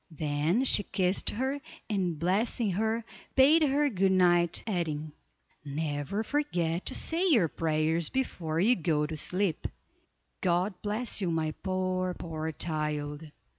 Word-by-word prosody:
Then 155 - 0
she 255 - +4
kissed 185 -1 +1
her, 265 +5 -2 0.3
and 185 -6 -1
blessing 200 +6 +1
her, 220 +4 -1 0.3
bade 290 +5 +6
her 290 0 +3
good 195 -6 +2
night, 175 -2 +3
adding: 160 -7 -2 0.5
"Never 145 +6 -2
forget 180 - -1
to - - 0
say 340 +4 +1
your 230 - +4
prayers 160 +1 0
before 165 -11 -2
you 230 +8 +4
go 155 -5 0
to 155 +1 -5
sleep. 180 +2 0 0.7
God 180 +2 +1
bless 215 +2 -1
you, 185 - 0
my 160 -1 0
poor, 185 -1 -1
poor 160 -1 -4
child." 150 -1 -3
180 Hz, 135 wpm, -29 LUFS, 160-215 Hz, 0.7 s, bade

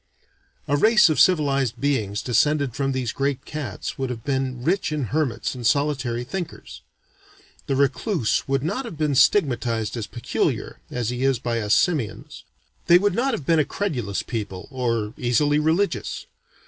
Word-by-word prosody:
A 145 - +2
race 215 +3 +5
of 155 - 0
civilized 140 -8 +3
beings 110 -8 -1
descended 140 +2 +2
from 135 -1 0
these 130 -3 -2
great 140 -1 -2
cats 140 -10 -5
would 130 -1 -1
have 115 -3 -6
been 130 -2 -2
rich 180 +3 0
in 150 -2 -1
hermits 145 -7 -1
and 125 - -8
solitary 130 -2 +1
thinkers. 170 +7 -7 0.9
The 135 - 0
recluse 140 - 0
would 135 0 0
not 200 - -2
have 200 -9 -8
been 150 -2 0
stigmatized 120 - +2
as 110 -3 -4
peculiar, 120 +3 -2
as 120 -2 -2
he 125 +1 -3
is 135 -2 +3
by 115 -1 -2
us 105 -1 +3
simians. 150 - -1 0.4
They 175 - +8
would 200 +1 +1
not 245 +4 +1
have 145 - -7
been 165 +1 +3
a - - +4
credulous 135 - -3
people, 100 -6 -5
or 115 -5 -1
easily 145 +5 +2
religious. 165 +6 0
135 Hz, 160 wpm, -23 LUFS, 120-155 Hz, 0.9 s, They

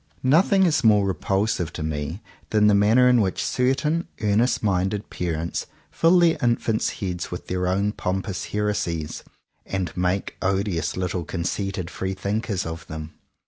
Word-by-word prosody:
Nothing 180 +9 +4
is 155 -6 +2
more 105 -3 +5
repulsive 95 -1 0
to - - -5
me 80 +4 -4 0.3
than 105 -1 +3
the 105 - +6
manner 110 +5 +5
in 125 -2 +5
which 95 -3 -1
certain 145 +6 +1
earnest 110 +4 +2
minded 100 +1 0
parents 85 -1 -3 0.2
fill 170 +2 +4
their 170 -2 +4
infants' 115 -2 0
heads 90 -3 -3
with 90 - -6
their 90 0 -1
own 100 +3 +1
pompous 95 -1 -3
heresies, 95 -7 -2 0.4
and 95 -4 -3
make 90 +2 -1
odious 95 -3 0
little 90 -1 -2
conceited 95 +1 -3
free 95 0 -3
thinkers 100 0 -2
of 80 0 -6
them. 80 0 -7
100 Hz, 145 wpm, -24 LUFS, 90-110 Hz, 0.4 s, the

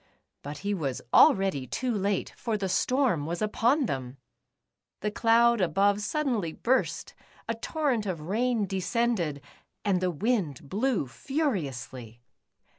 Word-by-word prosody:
But 145 +1 -7
he 205 - +1
was 140 -9 -3
already 190 -10 +5
too 250 - -2
late, 200 -2 -1
for 225 -3 -2
the 195 -2 -2
storm 195 - +1
was 170 +1 -3
upon 240 +7 +2
them! 130 - -4 0.8
The 210 - -1
cloud 235 0 +4
above 200 +4 +2
suddenly 225 - -1
burst, 260 +2 0 0.3
a 230 - 0
torrent 245 -2 -1
of 175 -5 -3
rain 220 +6 0
de 195 0 -3
scended, 185 -6 0 0.4
and 190 -3 +2
the 185 - +1
wind 175 - -1
blew 220 - 0
furiously. 135 - -4
200 Hz, 130 wpm, -28 LUFS, 160-235 Hz, 0.8 s, already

